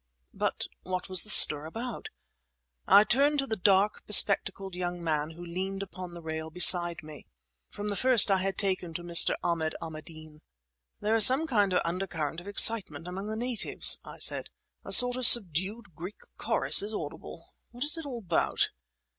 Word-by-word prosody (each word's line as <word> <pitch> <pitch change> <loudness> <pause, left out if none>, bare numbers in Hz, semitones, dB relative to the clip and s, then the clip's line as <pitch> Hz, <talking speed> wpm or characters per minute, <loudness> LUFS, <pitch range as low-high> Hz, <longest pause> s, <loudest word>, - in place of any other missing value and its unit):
But - - -6 0.2
what 185 0 -9
was 185 -1 +2
the 215 - -9
stir 150 -6 +7
about? 230 +6 -10 0.8
I 205 - +3
turned 280 +6 -1
to 275 - -3
the 225 - -6
dark, 195 +1 -2
bespectacled 195 -2 0
young 175 -1 -8
man 155 -2 -5
who 170 +2 -14
leaned 190 +3 -8
upon 185 -2 -13
the 170 - -14
rail 160 0 -9
beside 175 0 +4
me. 155 -2 -16 0.4
From 205 +1 -10
the 205 - -6
first 245 -3 +3
I 190 - -1
had 195 0 -6
taken 185 -4 -2
to 175 - -9
Mr. 170 -1 +2
Ahmad 165 -2 -5
Ahmadeen. 155 -1 -14 0.6
"There 215 +1 -4
is 225 -2 +8
some 270 +5 -1
kind 205 -9 -3
of 180 - -3
undercurrent 170 -3 -7
of 185 - -18
excitement 200 -6 0
among 190 +3 -10
the 220 0 -8
natives," 240 -2 0
I - - -15
said, - - -1 0.3
"a - - -13
sort 245 0 +4
of 255 - +4
subdued 195 0 +5
Greek 180 +6 -12 0.2
chorus - - 0
is 210 +2 -7
audible. 165 +1 -12 0.2
What's 275 +7 0
it 325 -2 -6
all 255 -3 -9
about?" 170 -2 -4
185 Hz, 175 wpm, -24 LUFS, 170-215 Hz, 0.8 s, is